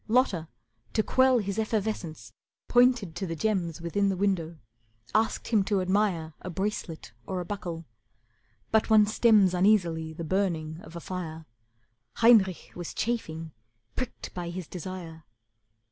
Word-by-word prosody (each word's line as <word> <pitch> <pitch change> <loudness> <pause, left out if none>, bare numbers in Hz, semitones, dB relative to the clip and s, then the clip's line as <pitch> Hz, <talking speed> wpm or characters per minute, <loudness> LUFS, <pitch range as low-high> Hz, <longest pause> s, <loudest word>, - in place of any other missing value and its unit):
Lotta, 215 -9 +2 0.5
to 215 - +2
quell 260 +1 +4
His 200 -1 -2
effervescence, 195 - -3 0.3
pointed 245 -8 +4
to 190 - -3
the 165 - -3
gems 175 -3 -1
Within 200 +4 +1
the 190 - -1
window, 175 -4 0 0.6
asked 220 +2 +1
him 215 -4 +3
to 200 -2 +1
admire 185 -4 0
A - - -6
bracelet 180 - -4 0.2
or 185 -1 -2
a 175 - -4
buckle. 170 -4 -5 0.9
But 220 0 +3
one 215 -1 +7
stems 210 -3 +4
Uneasily 175 -4 +2
the 160 +1 -6
burning 165 -3 -1
of 185 -5 -12
a - - -4
fire. 165 -3 -6 0.7
Heinrich 220 -6 +4
was 175 -1 -7
chafing, 165 -9 -2 0.4
pricked 255 -2 -5
by 175 -1 -4
his 180 0 -5
desire. 175 -2 -7
185 Hz, 140 wpm, -28 LUFS, 165-215 Hz, 0.9 s, one